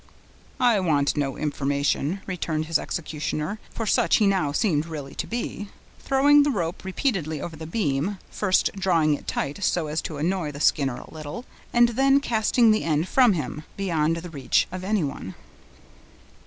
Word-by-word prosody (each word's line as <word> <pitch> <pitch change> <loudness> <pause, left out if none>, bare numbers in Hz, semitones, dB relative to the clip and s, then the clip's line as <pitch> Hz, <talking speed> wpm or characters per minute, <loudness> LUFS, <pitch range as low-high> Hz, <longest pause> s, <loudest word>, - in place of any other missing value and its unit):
"I 240 -5 +4
want 150 -6 +1
no 140 -3 -1
information," 145 +4 -1
returned 165 -4 -2
his 165 +1 +1
executioner 155 +4 -3
(for 225 - -5
such - - +3
he 215 - +3
now 190 -7 +2
seemed 155 -2 +1
really 145 -4 -7
to - - -4
be), 230 -3 -4 0.3
throwing 285 +2 +5
the 290 - +2
rope 175 - -2
repeatedly 185 - -1
over 165 +2 -6
the 160 0 -8
beam, 165 0 -1
first 190 -3 +1
drawing 170 -6 +2
it 145 - -5
tight 145 +8 -3
so 175 -3 +1
as 155 +1 -2
to 155 - -6
annoy 165 0 -1
the 140 - -8
Skinner 135 -4 +2
a - - -12
little, 155 - -7 0.3
and 240 0 +5
then 270 +3 +4
casting 230 -2 +3
the 215 - +1
end 160 +1 0
from 245 0 +5
him, 155 -2 -4
beyond 165 -4 0
the 170 0 -7
reach 140 -5 +1
of 185 0 -6
anyone. 165 - -2
170 Hz, 170 wpm, -25 LUFS, 150-210 Hz, 0.3 s, throwing